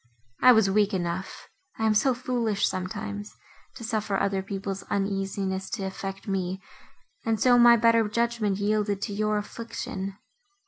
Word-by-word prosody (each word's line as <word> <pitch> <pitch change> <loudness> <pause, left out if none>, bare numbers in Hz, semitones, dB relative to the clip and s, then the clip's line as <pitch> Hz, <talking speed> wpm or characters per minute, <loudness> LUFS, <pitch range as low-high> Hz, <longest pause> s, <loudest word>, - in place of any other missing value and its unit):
I 255 - +9
was 220 -4 +5
weak 205 +1 +2
enough—I 190 - -5
am 220 - +4
so 255 +4 +3
foolish 240 -4 0
sometimes!—to 205 +5 -7
suffer 215 -3 -1
other 195 -1 0
people's 195 0 -4
uneasiness 195 -1 -2
to 205 - -5
affect 195 +1 -6
me, 190 -1 -2 0.6
and 225 -1 0
so 245 -1 +5
my 235 0 +8
better 230 -1 +4
judgment 230 -3 0
yielded 205 -1 0
to 205 - -3
your 215 +1 0
affliction. 205 -3 -5
205 Hz, 135 wpm, -26 LUFS, 195-225 Hz, 0.6 s, I